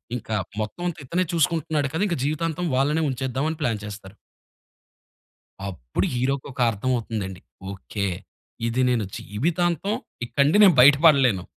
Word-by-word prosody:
ఇంకా 110 -2 -4 0.3
మొత్తవంతా 175 +10 -4
ఇతనే 175 +7 0
చూసుకుంటున్నాడు 160 -3 +1
కదా! 175 +6 0
ఇంకా 170 - -1
జీవితాంతం 165 +3 -2
వాళ్ళనే 150 +4 +2
ఉంచేద్దాం" 130 +2 -2
అని 160 - -4
ప్లాన్ 115 -7 0
చేస్తారు. 100 -1 -9 1.5
అప్పుడు 60 -11 -3
హీరోకొక 130 +1 -2
అర్థమవుతుందండి. 105 -4 -3 0.3
ఓకే. 100 +1 -4 0.6
"ఇది 120 +3 0
నేను 120 -3 +1
జీవితాంతం 170 - -1 0.3
ఇక్కడ 140 +3 +1
నుండి 155 +8 +3
నేను 190 -4 +7
బయటపడలేను." 140 - +5
135 Hz, 120 wpm, -24 LUFS, 110-160 Hz, 1.5 s, నేను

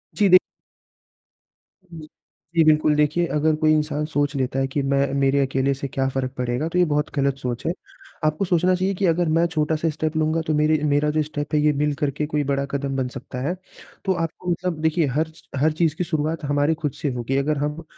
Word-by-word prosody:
जी 205 -2 +3
दे 185 - +9 1.5
जी। 160 -2 -9 0.5
जी, 165 - +5
बिल्कुल। 155 -1 +4
देखिए, 150 +3 +2
अगर 155 +1 +1
कोई 155 0 +2
इंसान 150 0 0
सोच 145 -2 -1
लेता 135 0 -1
है 135 - +1
कि 140 +2 -2
मैं 140 0 +1
मेरे 140 +1 +3
अकेले 135 +1 0
से 135 +1 -5
क्या 135 0 -1
फ़र्क 130 -1 -2
पड़ेगा? 125 +5 -1
तो 180 - -2
ये 180 - +5
बहुत 150 0 0
गलत 140 -1 +1
सोच 125 0 -4
है। 170 - +1 0.5
आपको 155 +5 +1
सोचना 180 +1 +2
चाहिए 185 +2 0
कि 195 - 0
अगर 170 0 +2
मैं 170 - +4
छोटा-सा 160 0 0
स्टेप 155 +1 -3
लूँगा, 155 +1 +1
तो 160 -1 -2
मेरे 155 +1 +3
मेरा 145 0 +2
जो 155 0 +1
स्टेप 145 0 -5
है, 150 - +4
ये 150 0 +4
मिल 150 0 +1
करके 145 +1 0
कोई 150 -1 -1
बड़ा 140 0 0
कदम 140 -1 -2
बन 130 -1 0
सकता 130 0 -7
है। 180 - -1 0.5
तो 190 - +2
आपको 175 +1 -3
मतलब 170 -2 -2
देखिए, 160 0 +2
हर 155 +5 0
च 160 - -18 0.2
हर 155 +2 +3
चीज़ 160 0 0
की 180 - -1
शुरुआत 160 -1 -2
हमारी 145 +2 +2
खुद 150 - 0
से 145 - 0
होगी। 125 +3 -2
अगर 145 +2 0
हम 150 +3 -3
150 Hz, 220 wpm, -23 LUFS, 140-160 Hz, 1.5 s, दे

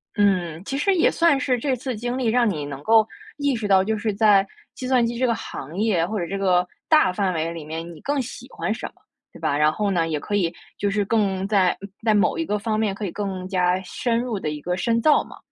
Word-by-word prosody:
嗯， 180 -5 +1
其 275 - -3
实 390 +6 +2
也 335 - +4
算 330 -5 +3
是 255 -3 +1
这 265 0 0
次 250 0 -4
经 240 +3 -3
历 255 - -2
让 235 0 +3
你 150 -6 -3
能 140 -1 -7
够 225 -1 +5 0.3
意 285 -3 +1
识 215 -2 -3
到 190 -1 +5
就 220 +2 -1
是 215 -1 -1
在 200 -2 +4 0.3
计 255 - -5
算 250 -3 +3
机 235 0 -3
这 255 - +1
个 230 - +1
行 155 +7 -7
业， 200 -6 +2
或 215 +1 -3
者 170 - -2
这 195 - -3
个 180 -2 +2 0.2
大 305 - +5
范 190 -2 0
围 165 +1 -1
里 165 -2 -7
面， 160 +2 -6
你 155 - -13
更 285 -1 0
喜 250 0 -8
欢 220 - -2
什 - - -5
么， - - -16 0.4
对 - - -14
吧？ 140 - 0
然 150 +1 +4
后 205 +3 -1
呢， 165 -3 +1
也 155 -2 -1
可 205 - -3
以 175 -4 +1 0.2
就 205 - 0
是 205 0 0
更 195 -3 0
在 195 -4 +2 0.3
在 220 -2 +3
某 210 +1 +2
一 330 - -1
个 210 - 0
方 215 +1 -1
面 210 -3 +1
可 205 - -4
以 175 - -3
更 190 -3 -4
加 180 -1 +1
深 230 +5 -1
入 235 -5 -2
地 155 - -2
一 150 0 -5
个 180 +2 -2
深 230 +4 +1
造 305 +3 +4
嘛。 - - -13
205 Hz, 280 characters per minute, -23 LUFS, 180-235 Hz, 0.4 s, 够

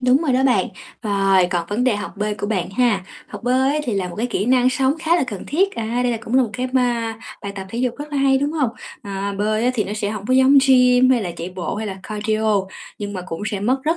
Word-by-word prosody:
Đúng 250 0 +4
rồi 285 -6 +1
đó 255 - +2
bạn, 260 -2 +3 0.3
rồi, 195 -3 +3
còn 175 -2 -1
vấn 215 +5 0
đề 250 -5 +2
học 205 - -5
bơi 210 +1 -1
của 205 - -4
bạn 195 -5 -1
ha. 215 -3 +1 0.2
Học - - -9
bơi 260 +4 +2
á 305 - 0
thì 245 - -2
là 190 -2 -1
một 175 - -9
cái 230 - -1
kỹ 215 -5 -1
năng 255 0 +4
sống 265 +2 +1
khá 325 +1 +2
là 305 - +1
cần 205 -6 -6
thiết, 385 +7 +1
à, 230 +1 -2
đây 245 - +1
là 230 - -2
cũng 230 - -4
là 265 - +6
một 235 - -3
cái 255 0 -2
ba 240 -3 0 0.3
bài 200 0 -5
tập 195 -1 -6
thể 230 - -4
dục 250 -1 0
rất 295 +1 -7
là 285 - -1
hay, 270 -1 +3
đúng 290 +2 -1
hông? 285 -7 0 0.3
À, 200 0 -4
bơi 215 +2 0
á 250 - +3
thì 215 - 0
nó 205 - -5
sẽ 210 -1 -2
hổng 210 -2 -6
có 255 - +2
giống 265 +2 +6
gym 250 -1 +5
hay 245 -3 +3
là 180 - -3
chạy 170 +2 -5
bộ 180 -3 -4
hay 220 +1 -3
là 195 -2 -5
cardio, 215 -1 0 0.4
nhưng 205 -1 -5
mà 185 - -4
cũng 165 +1 -6
sẽ 200 -3 -3
mất 250 +6 +2
rất 325 +2 +1
230 Hz, 290 wpm, -20 LUFS, 205-255 Hz, 0.4 s, là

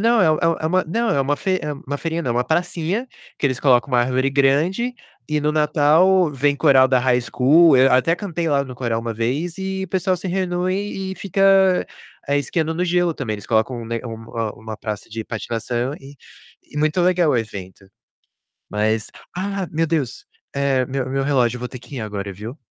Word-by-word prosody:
não, 230 +1 +3
é 160 -4 +5
um 165 +1 +1
é 155 - -2
uma 185 +3 +1
não, 225 +8 -1
é 140 - +2
uma 145 +2 0
fe 185 -1 0
é 150 - -3
uma 145 0 -5
feirinha 165 +2 -3
não, 125 - -2
é - - -4
uma 125 +1 +1
pracinha 175 +7 -1 0.3
que 145 - +2
eles 130 -2 -2
colocam 125 -2 +3
uma 120 - +4
árvore 130 +2 +1
grande 155 - +1 0.3
e 150 0 0
no 150 +1 0
Natal 155 +4 +4
vem 140 +1 +1
coral 135 -3 +5
da 130 -1 +3
High 125 0 +2
School. 140 +4 +5
Eu 135 +1 +5
até 130 +6 +3
cantei 175 -3 -4
lá 140 -3 +2
no 130 -2 -8
coral 120 -2 -2
uma 115 -1 -4
vez 140 - -2
e 190 0 -3
o - - -10
pessoal 185 -1 0
se 185 - -5
reúne 190 +1 -2
e - - -7
fica, 195 -1 +3 0.4
ah, 140 - +2
esquiando 160 +3 -1
no 180 +2 0
gelo 175 -1 +1
também. 125 -7 -4
Eles 105 - -7
colocam 115 +2 0
um 115 - -8
ne 115 0 -3
um, 115 0 -8
hã, 110 -1 -1
uma 110 -1 -8
praça 105 -2 -6
de 110 0 -6
patinação 120 +3 -3
e 135 +1 -13 0.5
e - - -15
muito 155 +4 +1
legal 175 -2 +3
o 130 - +2
evento. 100 -4 -6 0.8
Mas 110 +1 0 0.3
Ah! 195 0 -2
Meu 165 +1 +1
Deus, 150 -7 -2 0.3
eh, 135 -2 +1
meu 130 0 -3
meu 135 0 -1
relógio. 125 -4 +2
Eu - - -9
vou 125 - -4
ter 130 - -9
que 135 - -10
ir - - -3
agora, 100 -2 -5
viu? 110 - -8
145 Hz, 215 wpm, -21 LUFS, 125-175 Hz, 0.8 s, é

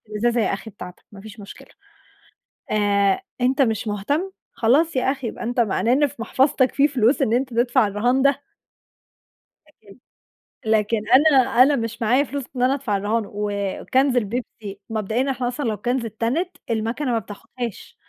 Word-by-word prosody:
الإزازة 230 +3 0
يا - - +1
أخي 200 +3 -6
بتاعتك 180 -2 -11
ما 200 - -11
فيش 215 +1 -12
مشكلة. 200 - -12 1.0
آآ 200 -2 +2 0.2
أنت 260 +3 +2
مش 225 -2 0
مهتم، 285 - -2 0.2
خلاص 280 +8 +2
يا 260 +1 +2
أخي 270 -3 -6
يبقى 225 - -7
أنت 245 +1 -1
معناه 230 +1 +1
إن 290 +3 +4
في 280 - -10
محفظتك 260 +2 +1
في 285 +1 +4
فلوس 265 +1 +2
إن 225 - +1
أنت 255 +3 +1
تدفع 240 0 +3
الرهان 240 +6 +1
ده. 280 0 0 1.1
لكن 215 -8 -19 0.7
لكن 220 0 +1
أنا 260 -2 +5
أنا 280 +2 +4
مش 230 -1 -4
معايا 250 +6 +3
فلوس 280 0 -5
إن 245 - -1
أنا 255 +2 +3
أدفع 255 -7 -2
الرهان، 210 +3 -1
وكانز 210 +6 -1
البيبسي 215 -3 -4
مبدئيًا 225 +5 -1
إحنا 250 -2 -2
أصلًا 265 +4 -4
لو 215 - -1
كانز 240 +4 -2
اتتنت، 235 - -2
المكنة 230 +5 -1
ما 230 - +2
بتاخدهاش. 225 +2 -8
240 Hz, 165 wpm, -22 LUFS, 215-265 Hz, 1.1 s, أنا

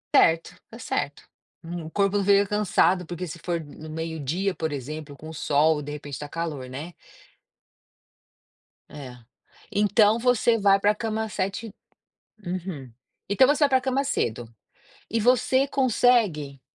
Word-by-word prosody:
Certo, 165 0 +4
tá - - -11
certo. - - -3 0.6
O 160 - -7
corpo 200 +1 +1
fica 200 0 +4
cansado 190 -3 +2
porque 175 +2 -5
se 165 +1 -8
for 175 -1 -1
no 155 0 -10
meio-dia 160 +4 -2
por 160 -2 -2
exemplo 145 +2 -6
com 155 - -11
o 160 - -8
sol, 150 +1 +2
de 145 0 -7
repente 145 -1 -7
tá 145 - -7
calor, 150 -6 -4
né. 150 +7 -7 2.0
É. 130 -4 -9 0.5
Então 210 +1 +4
você 240 -1 +3
vai 200 -2 +4
pra 205 +1 +3
cama 220 0 -2
7 200 +3 -3 0.8
uhum. 175 -8 -5 0.4
Então 205 +7 +5
você 290 +2 +2
vai - - +4
pra 260 -1 +4
cama 265 +1 0
cedo. 120 - -2 0.6
E 230 - 0
você 255 +3 +3
consegue 225 - +2
180 Hz, 140 wpm, -25 LUFS, 150-215 Hz, 2.0 s, Então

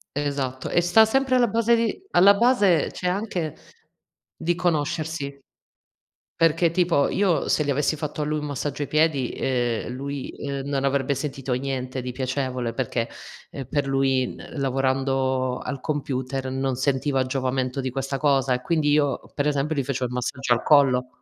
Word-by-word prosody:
Esatto, 140 -3 -2
e 175 - +3
sta 175 +6 +6
sempre 265 +3 +1
alla 245 -1 +4
base 230 +2 +3
di 230 - -1
alla 195 +3 +7
base 205 - +3
c'è 180 - -4
anche 180 -4 -2 0.8
di 170 +1 -1
conoscersi 155 -3 -2 1.0
perché 165 +1 +4
tipo, 170 -4 +2
io 190 -4 +1
se 150 - +2
gli 145 - 0
avessi 145 +3 +1
fatto 150 0 -4
a - - +1
lui 155 +1 -1
un 150 - -4
massaggio 145 +1 -3
ai - - -5
piedi, 155 -5 +1
ehm, 120 -4 -1
lui, 140 +1 -5
ehm, 140 -1 -5
non 140 -1 -1
avrebbe 140 0 +1
sentito 135 -1 -4
niente 130 0 -3
di 125 0 -4
piacevole, 130 -2 -2
perché, 120 -2 -2 0.4
ehm, 135 - -7
per 145 +1 -1
lui, 135 -1 +2 0.2
ehm, - - -8
lavorando 130 -1 0
al 135 0 -5
computer 135 -3 -3
non 135 0 -1
sentiva 135 +1 +1
giovamento 130 0 -1
di 130 - -2
questa 135 +1 -3
cosa, 135 -3 +2
e 125 - -1
quindi 155 0 +1
io 145 -2 +2
per 145 0 0
esempio 150 +2 0
gli 140 - 0
facevo 130 -1 -2
il 125 - -4
massaggio 125 +1 0
al 115 - 0
collo. 130 -4 +4
140 Hz, 170 wpm, -24 LUFS, 130-155 Hz, 1.0 s, alla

